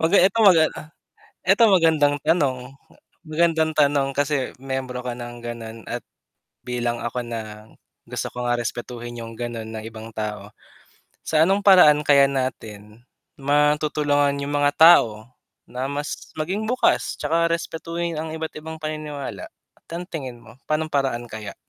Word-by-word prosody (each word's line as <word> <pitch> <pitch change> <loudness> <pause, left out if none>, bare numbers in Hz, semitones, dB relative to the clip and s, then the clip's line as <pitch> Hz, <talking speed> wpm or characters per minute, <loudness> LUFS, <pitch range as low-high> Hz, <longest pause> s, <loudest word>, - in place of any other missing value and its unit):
Kumbaga 165 +5 +4
ito 195 +4 +2
maga 180 -7 +7 0.8
ito 195 +5 +4
magandang 160 -6 +4
tanong, 145 -7 +2 0.7
magandang 160 0 +2
tanong 140 -2 +3
kasi 145 -2 -1
miyembro 130 -1 -5
ka 125 - -3
ng 120 0 -8
gano'n, 115 -1 -6
at - - -4 0.7
bilang 120 -1 -2
ako 120 +1 -3
na, 110 -2 -7 0.3
gusto - - -5
ko 125 - -4
nga 120 0 +1
respetuhin 120 0 -5
yung 115 0 -9
gano'n 115 -2 -5
ng 110 -1 -7
ibang 115 0 -9
tao. 105 -2 -5 0.7
Sa 155 0 +2
anong 195 +2 +2
paraan 180 -7 +7
kaya 140 -2 +5
natin, 115 -4 -5 0.3
matutulungan 145 0 +2
yung 140 - -4
mga 145 0 +3
tao, 120 -9 +5 0.4
na 125 +1 -3
mas 145 +2 -5
maging 190 +8 -2
bukas, 250 +3 +1
tsaka 170 +1 +1
respetuhin 170 0 -3
ang 160 0 -4
iba't 160 0 -5
ibang 160 +1 -8
paniniwala. 155 -2 -5 0.4
Tan 170 +1 -5
tingin 130 -7 -6
mo, 115 +2 -16
pa'no'ng 155 +1 -1
paraan 135 -4 0
kaya? 105 -2 -7
140 Hz, 140 wpm, -23 LUFS, 120-160 Hz, 0.8 s, maga